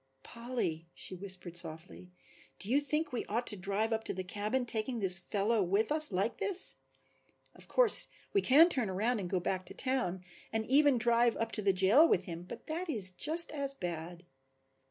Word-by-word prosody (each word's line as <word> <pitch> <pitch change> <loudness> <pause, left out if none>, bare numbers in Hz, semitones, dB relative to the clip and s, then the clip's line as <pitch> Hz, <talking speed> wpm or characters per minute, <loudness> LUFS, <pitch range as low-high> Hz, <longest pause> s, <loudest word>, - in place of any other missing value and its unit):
"Polly," 235 -9 -4
she - - -6
whispered 185 -2 -5
softly, 170 +2 -2 0.5
"do 205 - -4
you 280 +3 +3
think 300 +2 -1
we 240 - -2
ought 235 +3 -2
to 210 - 0
drive 200 +4 -2
up 220 0 -2
to - - -1
the 185 - -4
cabin 210 +7 -2
taking 235 +1 -1
this 185 -4 +3
fellow 205 +4 0
with 200 +7 0
us 305 -4 +2
like 195 +4 -1
this? 405 -3 -2 0.8
Of - - -12
course - - +5 0.3
we 400 - +3
can 305 +4 +6
turn 255 - 0
around 215 +5 -1
and 180 -3 -5
go 185 - 0
back 185 +1 -3
to - - -8
town 245 -9 -2 0.3
and 220 0 -2
even 280 +1 +4
drive 235 0 +2
up 230 - -3
to 215 - -1
the 200 -1 +3
jail 195 - +5
with 185 - +1
him 170 -1 -6
but - - -10
that 335 +3 -5
is 205 -10 -1
just 320 - +2
as 280 -2 -4
bad. 175 -2 -6
220 Hz, 195 wpm, -32 LUFS, 185-270 Hz, 0.8 s, can